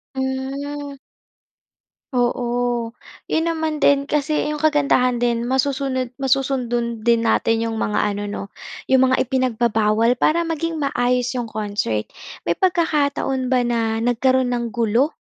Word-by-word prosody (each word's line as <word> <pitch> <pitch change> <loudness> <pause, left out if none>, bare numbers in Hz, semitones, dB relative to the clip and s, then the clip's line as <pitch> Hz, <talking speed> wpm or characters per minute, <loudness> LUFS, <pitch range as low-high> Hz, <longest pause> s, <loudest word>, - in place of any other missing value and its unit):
Hmm. 275 +2 -4 1.2
Oo, 245 -1 0 0.4
'yon 320 - +1
naman 315 -1 -2
din 280 -1 +3
kasi 300 +1 0
yung 300 - -2
kagandahan 280 -5 +2
din 235 -1 +1
masusunod, 265 0 0
masusundan 245 -4 -1
din 235 -1 +4
natin 225 0 +2
yung 225 - -4
mga 210 -1 0
ano 205 0 -1
'no 205 0 -5 0.5
yung 260 0 +5
mga - - +3
ipinagbabawal 235 -2 +1
para 320 +6 +2
maging 330 -1 -2
maayos 250 -3 +1
yung 240 - -2
concert. 205 - -2 0.4
May - - +1
pagkakataon 285 -7 +1
ba 250 - +3
na 230 -2 0
nagkaroon 250 +2 +2
ng 240 -1 -1
gulo 235 +6 +1
255 Hz, 125 wpm, -21 LUFS, 235-280 Hz, 1.2 s, yung